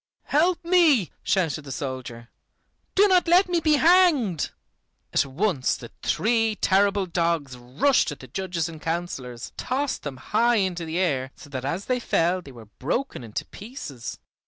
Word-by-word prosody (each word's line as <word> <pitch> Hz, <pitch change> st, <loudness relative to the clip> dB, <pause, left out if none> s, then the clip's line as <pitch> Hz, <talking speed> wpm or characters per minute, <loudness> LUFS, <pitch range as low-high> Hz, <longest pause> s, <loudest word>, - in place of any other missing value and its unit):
"Help 345 Hz, +4 st, +2 dB
me," 325 Hz, -, +4 dB
shouted 165 Hz, -6 st, 0 dB
the 140 Hz, -, -9 dB
soldier; 125 Hz, -3 st, -6 dB, 0.7 s
"do 405 Hz, +2 st, +6 dB
not 365 Hz, -3 st, +3 dB
let 360 Hz, +3 st, +5 dB
me 350 Hz, -1 st, +1 dB
be 310 Hz, -1 st, +2 dB
hanged." 305 Hz, -, +4 dB, 0.6 s
At -, -, +2 dB
once 145 Hz, -1 st, 0 dB
the 115 Hz, -, -11 dB
three 225 Hz, -1 st, +1 dB
terrible 200 Hz, 0 st, +2 dB
dogs 165 Hz, -6 st, -1 dB
rushed 130 Hz, -, +1 dB
at 145 Hz, -, -8 dB
the 130 Hz, -, -11 dB
judges 175 Hz, +3 st, -3 dB
and 160 Hz, -2 st, -10 dB
councilors, 150 Hz, -8 st, -4 dB
tossed 270 Hz, +2 st, -2 dB
them 140 Hz, -3 st, -6 dB
high 230 Hz, -, +2 dB
into 185 Hz, -5 st, 0 dB
the 160 Hz, +1 st, -3 dB
air, 140 Hz, -8 st, 0 dB
so 145 Hz, -, -14 dB
that 130 Hz, -1 st, -4 dB
as 170 Hz, +8 st, -2 dB
they 255 Hz, -1 st, 0 dB
fell 180 Hz, -5 st, +1 dB
they 140 Hz, -, -12 dB
were 115 Hz, -3 st, -12 dB
broken 135 Hz, -, -3 dB
into 110 Hz, -2 st, -5 dB
pieces. 200 Hz, -, -8 dB
180 Hz, 160 wpm, -25 LUFS, -, 0.7 s, do